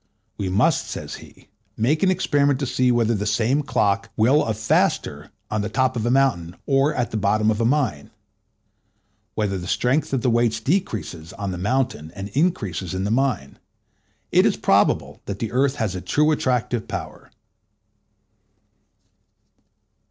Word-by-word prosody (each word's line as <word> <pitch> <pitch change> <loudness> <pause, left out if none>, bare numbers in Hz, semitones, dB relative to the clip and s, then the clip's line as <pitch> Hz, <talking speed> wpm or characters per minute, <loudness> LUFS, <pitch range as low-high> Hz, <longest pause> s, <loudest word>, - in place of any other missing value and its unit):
We 95 - -3
must, 120 - +2
says - - -6
he, - - -17 0.3
make 140 +8 +1
an 190 - +4
experiment 145 -7 +2
to - - 0
see 125 0 +1
whether 120 -1 +2
the 105 -1 -2
same 120 +6 +1
clock 100 -8 0
will 130 +7 +4
of 110 -2 -2
faster 110 0 0 0.2
on 105 - 0
the 105 - -3
top 130 +3 +1
of 115 0 -1
a - - +2
mountain 120 -11 +1
or 140 +2 +2
at 125 -2 -1
the 110 - -2
bottom 105 +1 +2
of 110 +1 -1
a - - +2
mine; 120 - 0 1.3
whether 100 -3 -1
the 90 - -7
strength 125 +10 0
of 135 -3 0
the 125 - +3
weights 115 -1 +2
decreases 110 - -2
on 100 -2 -4
the 90 - -5
mountain 105 - -1
and 100 +1 -6
increases 105 - -1
in 95 - -2
the 100 - -1
mine. 125 - -1 0.7
It - - +5
is - - +2
probable - - +1
that 100 - -4
the 115 +2 -4
earth 135 +2 +1
has 110 -8 -2
a 90 - -5
true 150 +8 +2
attractive 125 -5 -1
power. - - -7
115 Hz, 165 wpm, -22 LUFS, 100-135 Hz, 1.3 s, It